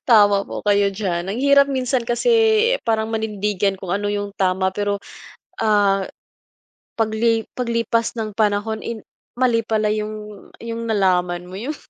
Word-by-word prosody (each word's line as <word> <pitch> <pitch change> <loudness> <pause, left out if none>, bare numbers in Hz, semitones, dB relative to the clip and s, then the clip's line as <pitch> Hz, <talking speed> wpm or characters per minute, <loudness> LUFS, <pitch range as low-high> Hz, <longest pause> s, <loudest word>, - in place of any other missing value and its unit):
Tama 205 -3 +5
po - - -6
kayo 200 -1 +4
diyan. 185 -4 -2
Ang 220 - -3
hirap. 280 0 +6
Minsan 255 -2 0
kasi, 240 - +1 0.5
eh, - - -14
parang 220 -1 0
manindigan 210 -3 -1
kung 185 - -6
ano 205 +2 -1
yung 205 0 -3
tama, 190 0 +1
pero, 205 +1 -2 0.6
ah, 205 -3 +3 0.9
pagli 225 0 +1
paglipas 230 -1 -1
ng 220 -2 -3
panahon, 215 0 0
eh, 230 -2 -5 0.4
mali 245 -2 +2
pala 215 -1 0
yung 210 -1 -6 0.2
yung 230 0 -4
nalaman 180 -4 +1
mo 180 - -13
yung 290 +7 -4
215 Hz, 145 wpm, -21 LUFS, 200-230 Hz, 0.9 s, hirap